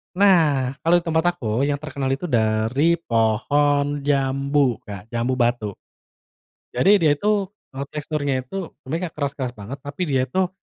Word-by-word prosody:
Nah 160 -10 +4
kalau 165 +2 +3
di 175 - +2
tempat 165 +1 +1
aku 120 -2 -1
yang 145 - +1
terkenal 140 -2 -4
itu 135 +5 -1
dari 120 +3 +2
pohon 145 +3 +1
jambu, 140 -2 +1
Kak. 105 +1 -10
Jambu 120 +2 0
batu. 120 -5 0 1.0
Jadi 195 +11 +5
dia 160 -6 +3
itu, 205 +6 +1 0.3
eee, 140 - -3
teksturnya 150 -2 -2
itu 180 +8 -6
sebenernya 165 +6 -3
nggak - - -49
keras-keras 140 -4 -3
banget 105 +6 -8
tapi 145 +5 -8
dia 130 -2 +2
itu, 180 +8 0
140 Hz, 150 wpm, -22 LUFS, 125-160 Hz, 1.0 s, Jadi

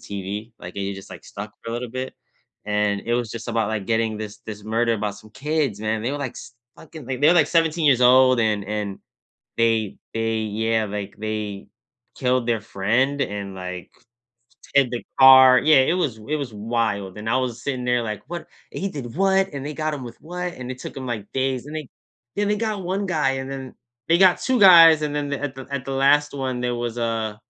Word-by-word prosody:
TV, 100 +3 -5
like, 90 +2 -10
you 100 0 -3
just, 95 0 -11
like, - - -11
stuck 105 +2 -8
for 115 - -6
a - - -3
little 120 0 -4
bit. 130 +2 -5 0.5
And 105 -1 0
it 120 - -2
was 120 -2 -1
just 115 +1 -7
about, 115 -2 0
like, 110 -2 -3
getting 110 -1 0
this 105 0 -7
this 105 -1 -8
murder 115 +2 +1
about 105 -2 -3
some 110 - -15
kids, 140 -2 -1
man, 110 +1 -1
they 120 - -1
were, 145 - -3
like, 135 -4 -4
s 120 - -11 0.2
fucking 160 -2 -12
they 130 0 -2
they 145 +4 +3
were, 175 - +6
like, 160 -4 +5
17 165 -1 +2
years 130 -4 +5
old, 130 0 +6
and 105 -2 +1
and 105 -1 -4 0.6
they 115 -3 +1 0.2
they 115 0 -1
yeah, 110 +1 0
like, 100 -1 -6
they 105 -2 -5 0.5
killed 125 -1 +1
their 115 -2 +1
friend 115 +7 0
and, 100 -5 -5
like, 90 -1 -7 0.8
hid 140 -3 +4
the 120 - -4 0.2
car 130 -1 +9
Yeah, 155 -2 +5
it 175 - +2
was 145 -11 -1
it 155 - +1
was 140 -6 -5
wild, 105 -3 -2
and 110 +1 -4
I 125 - +3
was 125 -3 -3
sitting 130 -3 -2
there 125 -1 +1
like, 105 -3 -5
“What 175 0 -6 0.3
and - - -6
he 195 - 0
did 130 -5 -7
what, 195 0 +3
and 140 -1 -5
they 150 - -4
got 155 0 -2
him 140 - -7
with 120 -1 -10
what?” 180 +2 -5
and 125 0 -7
it 130 - -6
took - - -8
‘em, 130 -1 -6
like, 110 -4 -5
days, 130 -1 -1
and 150 - -8
they 155 -4 -6 0.5
Then 205 0 +1
they 210 - +1
got 215 -2 -2
1 190 +3 -2
guy, 150 -7 +1
and 130 0 -6
then 135 -2 -7 0.3
they 170 +1 +4
got 185 -2 +6
2 255 -3 +1
guys, 165 -5 +9
and 150 -1 -2
then 145 -1 -2
the 140 - -3
at 145 -2 -3
the 130 0 -9
at 140 -2 -3
the 135 - -3
last 145 +2 +3
one, 130 -3 -3
there 125 0 -1
was, 120 0 -4
uh, 115 -2 -2
125 Hz, 230 wpm, -23 LUFS, 110-145 Hz, 0.8 s, car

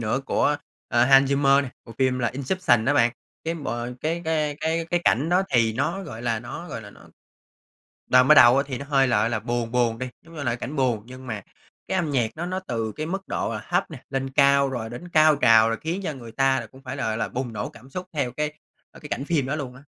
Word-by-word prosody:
nữa 115 +4 -1
của, 145 - +2 0.3
ờ, 120 0 +3
Hans 135 +1 +6
Zimmer, 140 0 +4 0.2
bộ 115 - -11
phim 130 -1 +2
là 120 - +1
"Inception" 130 -2 +1
đó 140 +4 +2
bạn. 120 -4 +4 0.3
Cái 165 +1 -1
bộ 120 -6 -4
cái 165 +2 -2
cái 155 -2 0
cái 160 +1 0
cái 175 - +2
cảnh 140 +7 +3
đó 180 +2 +3
thì 115 -3 +3
nó 170 - -1
gọi 120 -10 -8
là 115 -2 0
nó 165 +8 -8
gọi 115 -5 -5
là 105 - -11
nó - - -18 1.1
đoạn 130 0 +6
mở 155 - +9
đầu 130 0 +7
thì 135 -3 -5
nó 140 - -6
hơi 135 -2 +3
lợ 110 -2 +2
là 115 -2 -2
buồn 120 +1 -2
buồn 120 -2 +1
đi, 130 - -4
giống 165 0 -16
như 150 - -5
là 120 -2 0
cảnh 140 +5 -6
buồn. 125 -6 +1
Nhưng 130 +1 -11
mà 110 -5 -5 0.5
cái 190 - 0
âm 170 -5 0
nhạc 120 -5 +1
nó 170 - -3
nó 185 +1 -2
từ 115 - -3
cái 155 - -3
mức 190 +3 -4
độ 115 - -2
thấp 180 +1 0
nè, 140 -6 -10
lên 135 0 -2
cao, 140 0 +4
rồi 120 -4 -4
đến 125 +9 -8
cao 155 -3 +5
trào, 115 -4 +6
rồi 115 - -1
khiến 170 +5 -3
cho 155 - -2
người 120 -4 -10
ta 135 +1 +1
cũng 135 0 -16
phải 130 0 -6
là, 140 - -3
gọi 110 - -1
là, 115 - -2
bùng 125 -1 -4
nổ 105 -2 -4
cảm 125 +3 -16
xúc 185 +5 -6
theo 140 -5 -1
cái, 150 +3 -2 0.4
ơ, - - -15
cái - - -9
cảnh 135 - -3
phim 150 -5 0
đó 140 +3 -2
luôn 130 -4 -5
á. 130 - -14
135 Hz, 255 wpm, -24 LUFS, 120-155 Hz, 1.1 s, mở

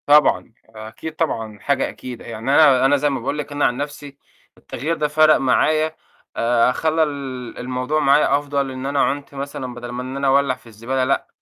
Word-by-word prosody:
طبعًا، 145 -5 +4 0.2
أكيد 110 +8 -9
طبعًا، 110 -10 -2
حاجة 140 +4 0
أكيدة. 125 -2 -9
يعني 115 +3 -4
أنا 140 -3 +6
أنا 145 +2 +4
زَي 145 +1 +1
ما 135 -2 -2
باقول 130 +5 -3
لِك، 150 0 -5
أنا 145 0 +1
عن 120 - +1
نفسي 145 0 -6 0.4
التغيّر 155 +7 -4
ده 150 - +1
فَرَق 155 +1 +5
معايا، 155 +4 +2 0.4
آآ 120 +1 +3
خلّى 160 +4 +1
ال 135 -5 -5
الموضوع 125 +4 -2
معايا 140 -1 +4
أفضل، 140 -2 -2
إن 130 0 -6
أنا 140 0 -1
عُنت 145 0 -1
مثلًا 135 -2 -5
بَدَل 120 0 -8
ما 120 +1 -5
إن 130 +1 -6
أنا 140 0 0
أولّع 135 -1 +3
في - - -21
الزبالة، 115 +4 -2
لأ، 135 +2 0
135 Hz, 195 wpm, -21 LUFS, 125-145 Hz, 0.4 s, أنا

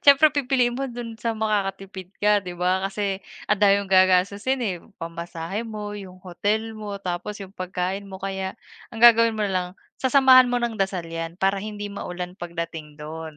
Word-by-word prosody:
siyempre, 285 +1 +7
pipiliin 255 -4 +2
mo 270 +2 -3
do'n 235 -2 -7
sa 230 -1 -1
makakatipid 195 -3 -2
ka 210 0 +3
'di 180 -2 -8
ba, 180 +2 +1
kasi 195 -1 -2 0.2
ang 210 -1 0
dami 200 -1 +6
mong 195 - -7
gagastusin, 190 +7 +3
eh. 185 -5 -2 0.2
Pamasahe 170 +5 -5
mo, 210 -1 -5
'yung 195 -3 -9
hotel 210 +5 -1
mo, 210 -2 -6
tapos 195 +2 -4
'yung 190 - -15
pagkain 185 +1 -3
mo, 190 - -7
kaya 190 +1 -4 0.3
ang 230 -1 +1
gagawin 230 -1 +7
mo 215 - 0
na 200 - -1
lang, 180 -1 0 0.3
sasamahan 260 -1 +7
mo 245 - +1
ng 235 -3 -2
dasal 190 -3 0
'yan 165 0 -5
para 195 +1 +1
hindi 205 0 -6
maulan 180 -2 -5
pagdating 170 -4 -6
do'n. 155 0 -7
195 Hz, 180 wpm, -24 LUFS, 180-220 Hz, 0.3 s, siyempre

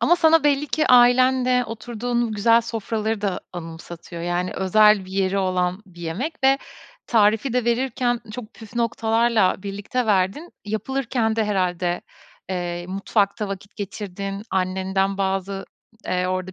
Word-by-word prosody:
Ama 345 - +4
sana 325 -2 +4
belli 290 0 +2
ki 310 +1 0
ailenle 250 0 +5
oturduğun 235 +1 -3
o - - -5
güzel 230 +2 +4
sofraları 225 -1 -3
da 200 -3 -1
anımsatıyor. 170 0 -8
Yani, 175 +1 -1
özel 210 +1 +4
bir 185 - -12
yeri 195 0 +1
olan 185 0 0
bir 175 -2 -15
yemek 195 - -3
ve 270 +1 +5 0.5
tarifi 220 +2 +3
de 250 -1 +1
verirken 240 0 0
çok 235 -1 -8
püf 220 0 -13
noktalarla 225 -4 +1
birlikte 205 +5 -3
verdin. 200 - 0
Yapılırken 225 +1 -1
de 220 - +2
herhâlde, 180 -3 0 0.5
eee, 175 -1 -3
mutfakta 200 +2 0
vakit 195 +1 -8
geçirdin, 195 -1 -5
annenden 190 +1 0
bazı, 195 0 -2 0.4
eee, 180 0 0
orada 185 0 -3
210 Hz, 140 wpm, -23 LUFS, 185-240 Hz, 0.5 s, ailenle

